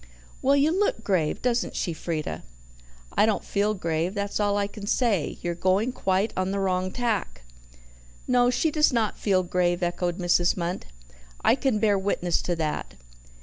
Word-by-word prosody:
"Well, 275 +2 +4
you 285 +3 +3
look 370 - 0
grave; 175 -6 0
doesn't 245 -1 0
she, 170 - -1
Frieda?" 155 - -4 0.7
"I 215 - +4
don't 220 - 0
feel 210 +1 0
grave, 170 +1 -2
that's 200 0 -2
all 205 -1 +2
I 200 - +1
can 205 0 -8
say; 210 - +1
you're 175 0 -1
going 190 +7 +1
quite 195 -2 0
on 185 0 -1
the 200 +1 -1
wrong 185 -1 0
tack." 215 - -2 0.8
"No, 245 -1 +4
she 305 +5 +1
does 300 0 +3
not 230 -4 0
feel 190 -3 +2
grave," 175 0 0
echoed 175 0 -1
Mrs. 175 -1 +2
Munt. 175 0 -3 0.6
"I - - +5
can 265 -3 +1
bear 210 -2 +2
witness 180 -3 0
to 175 - -1
that. 150 - -3
195 Hz, 170 wpm, -26 LUFS, 175-225 Hz, 0.8 s, I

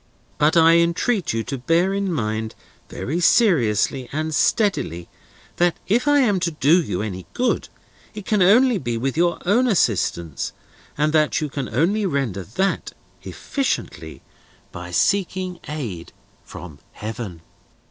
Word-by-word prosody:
But 150 +3 +3
I 165 0 +6
entreat 170 +5 +1
you 115 0 -2
to 135 +2 -5
bear 170 +8 +1
in 200 -1 -1
mind, 110 -6 -3 0.3
very 145 - -3
seriously 135 - +2
and 155 +2 -3
steadily, 150 - 0 0.5
that 175 -1 +2
if 235 +8 +1
I 290 -1 +5
am 205 -7 +2
to 175 -1 0
do 155 +2 +3
you 105 - -3
any 95 -4 -6
good, 250 0 -1 0.5
it 210 -2 -8
can 210 -1 +1
only 225 +4 +5
be 120 -3 -3
with 135 +3 -2
your 170 +1 +1
own 235 +8 +3
assistance; 90 - 0 0.4
and 150 +1 +1
that 155 -1 +2
you 150 - -3
can 140 -2 -4
only 190 - +1
render 130 - -2
that, 190 - -2 0.3
efficiently, 275 -1 -4 0.5
by - - -8
seeking 185 -2 0
aid 115 - -6 0.3
from 75 -6 -11
Heaven." 105 -6 -7
160 Hz, 140 wpm, -21 LUFS, -, 0.5 s, I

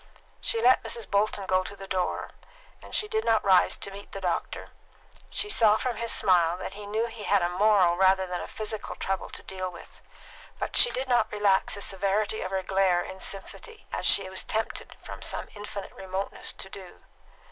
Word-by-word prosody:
She 230 - 0
let 250 +3 +5
Mrs. 230 -2 -2
Bolton 200 0 +1
go 185 0 +2
to 200 - -8
the 195 0 -10
door, 185 -1 -2 0.5
and - - -7
she 425 - +2
did 440 +1 -1
not 225 -2 +2
rise 190 -2 +5
to 200 - -4
meet 200 +1 -11
the 195 - -4
doctor; 180 -3 -3 0.6
she 420 - 0
saw 220 - +5
from 245 -1 -2
his 230 0 -2
smile 175 -2 +4
that 190 - -6
he 205 0 -8
knew 220 +3 0
he 230 -1 -8
had 200 -2 +2
a 175 - +1
moral 185 -2 +4
rather 190 +1 +4
than 180 -1 -4
a - - -6
physical 215 0 -5
trouble 195 0 -3
to - - -9
deal 185 -1 -4
with, 170 - -13 0.6
but - - -4
she 485 - +5
did 260 - -3
not 245 -1 +2
relax 205 -2 +2
the 200 - -7
severity 200 +3 0
of 185 - -3
her 190 0 -2
glare 190 -2 +2
in 190 - -9
sympathy, 425 - -5
as - - 0
she 195 -1 +5
was 190 0 -1
tempted 220 +1 -3
from - - -8
some - - -1
infinite 205 -1 -7
remoteness 190 +1 -4
to - - -6
do. 185 -2 -11
195 Hz, 200 wpm, -27 LUFS, 190-215 Hz, 0.6 s, let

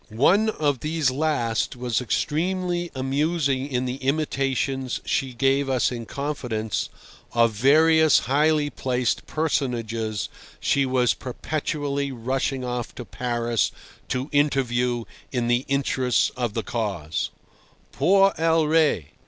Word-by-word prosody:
One 200 - +4
of 145 - 0
these 155 -2 0
last 130 -7 0
was 120 -2 -1
extremely 175 - -1
amusing 140 0 0
in 125 0 0
the 125 +1 -3
imitations, 135 -2 -1
she 135 -1 0
gave 135 +2 +2
us 130 -1 +2
in 115 -2 -5
confidence, 125 -7 -3 0.4
of 115 -1 +4
various 155 +7 +5
highly 145 +3 +2
placed 125 -2 -1
personages 115 -8 -1 0.3
she 140 -1 +2
was 125 -2 +2
perpetually 140 +1 -3
rushing 130 +2 -2
off 125 -1 -4
to 125 - -7
Paris 120 0 -1 0.4
to 130 +2 -2
interview 125 -5 +1 0.3
in 120 -2 -1
the 120 +2 +1
interests 135 -2 +1
of 120 -4 -2
the 115 - -1
cause—Por 110 - -1
el 165 -1 +3
Rey! 150 - +2
135 Hz, 115 wpm, -24 LUFS, 120-150 Hz, 0.4 s, various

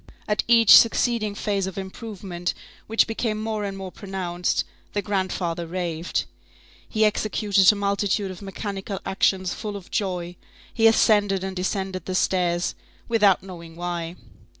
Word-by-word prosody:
At 210 0 +1
each 230 -2 +8
succeeding 230 -2 +2
phase 200 -2 -1
of 190 - -7
improvement, 190 -2 -5 0.3
which 225 +1 +3
became 225 -1 -2
more 215 -1 -2
and 195 -1 -4
more 190 -1 -6
pronounced, 180 -3 -2 0.3
the 205 - 0
grandfather 185 -4 -2
raved. 170 -1 -2 0.6
He 220 -1 +2
executed 205 -2 +3
a - - -3
multitude 200 0 0
of 185 - -10
mechanical 195 0 -5
actions 190 -1 +1
full 210 -2 -5
of 190 - -13
joy; 180 -3 -2 0.4
he 225 -1 +5
ascended 205 -4 +3
and 190 0 -4
descended 190 -1 -2
the 185 - -3
stairs, 175 -2 +1 0.3
without 205 -6 +4
knowing 170 -3 -10
why. 175 -1 -4
195 Hz, 140 wpm, -24 LUFS, 180-210 Hz, 0.6 s, each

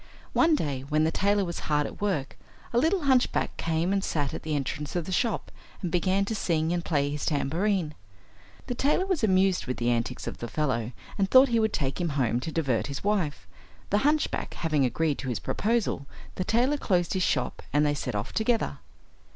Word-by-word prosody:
One 330 -1 +4
day, 145 - -2
when 155 0 +2
the 160 - +2
tailor 200 +2 +2
was 170 -1 -4
hard 150 -1 +2
at - - -8
work, 180 -10 -1 0.4
a 235 - +4
little 335 +7 +2
hunchback 260 -3 +2
came 165 +3 0
and 195 -1 0
sat 145 -7 -1
at - - -5
the 155 -1 -2
entrance 145 +2 -3
of 175 -2 -1
the 190 - -5
shop, 225 +3 0 0.3
and 175 - -1
began 190 +3 +2
to 220 - -3
sing 165 -5 0
and 175 -1 -1
play 145 -4 0
his 145 0 -4
tambourine. 165 +3 0 0.7
The - - -2
tailor 290 +9 +1
was 370 -9 -1
amused 190 -4 +3
with 125 - -2
the 120 0 +1
antics 115 -1 -2
of - - -5
the 120 - -4
fellow, 125 -5 -1 0.3
and 195 -1 +2
thought 260 +3 +7
he 230 -1 +2
would 220 -1 +2
take 140 0 -2
him 170 - 0
home 120 -3 +2
to 145 +6 -5
divert 135 -8 0
his 140 -1 -5
wife. 195 -8 0 0.5
The 205 - +4
hunchback 300 +5 0
having 155 -5 +1
agreed 150 +3 0
to 130 - -4
his 120 - -1
proposal, 215 -11 -1 0.3
the 185 - -3
tailor 250 +8 +2
closed 180 -9 +1
his 190 - 0
shop - - 0
and 145 +1 +3
they 145 - +2
set 145 - -3
off 105 +4 -3
together. 225 +1 0
170 Hz, 210 wpm, -27 LUFS, 145-210 Hz, 0.7 s, thought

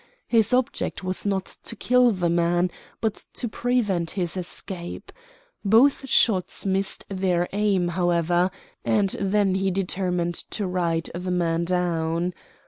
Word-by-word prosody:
His 225 -3 +3
object 250 -5 0
was 185 +2 -2
not 195 -2 0 0.2
to 230 - -6
kill 250 +2 +4
the 185 -6 0
man, 175 +1 +2 0.3
but 220 -2 -2
to 240 - -2
prevent 215 -8 0
his 175 -2 0
escape. 175 -1 -5 0.5
Both 260 +6 +4
shots 190 -5 +2
missed 195 0 -1
their 185 -2 0
aim, 200 -4 +1
however, 175 0 +2 0.3
and 200 -3 +2
then 195 -1 +2
he 190 0 +1
determined 180 -2 -1
to 200 +4 -3
ride 170 -3 -1
the 180 +2 -4
man 170 -2 +1
down. 170 -1 0
185 Hz, 135 wpm, -24 LUFS, 175-200 Hz, 0.5 s, kill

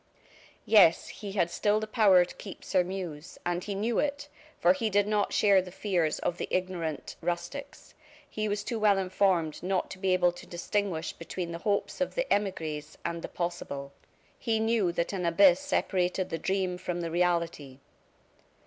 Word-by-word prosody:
Yes, 190 -7 +5
he 205 -3 -7
had 175 -4 +1
still 210 +4 +2
the 215 - -3
power 205 -5 +5
to - - -11
keep 195 - -9
Sairmeuse, 180 -3 -2
and 175 0 -1
he 205 - -4
knew 220 +3 0
it, 290 0 -2 0.3
for 175 +1 +5
he 220 +4 -1
did 205 0 +3
not 210 -1 +1
share 200 -3 +4
the 180 - -9
fears 180 -4 0
of 175 - -2
the - - -2
ignorant 180 -5 -3
rustics. 225 - -5 0.3
He 215 0 -3
was 205 0 -1
too 230 +1 -3
well 210 -2 +4
informed 185 -4 +1
not 185 0 -1
to 185 - -8
be 190 -1 +1
able 180 -1 +4
to 175 - -12
distinguish 175 -1 -2
between 170 +1 -5
the 170 - -5
hopes 200 +6 -1
of 275 - -1
the - - 0
emigres 160 -7 -3
and 170 0 -2
the - - -5
possible. 140 -6 -4 0.5
He 225 -1 0
knew 220 -5 +2
that 170 +2 -2
an 185 -2 -2
abyss 175 +2 +5
separated 180 0 0
the 165 - -2
dream 185 +1 -1
from 175 -1 -3
the 165 -1 -3
reality. 170 -6 0
185 Hz, 175 wpm, -29 LUFS, 170-205 Hz, 0.5 s, Yes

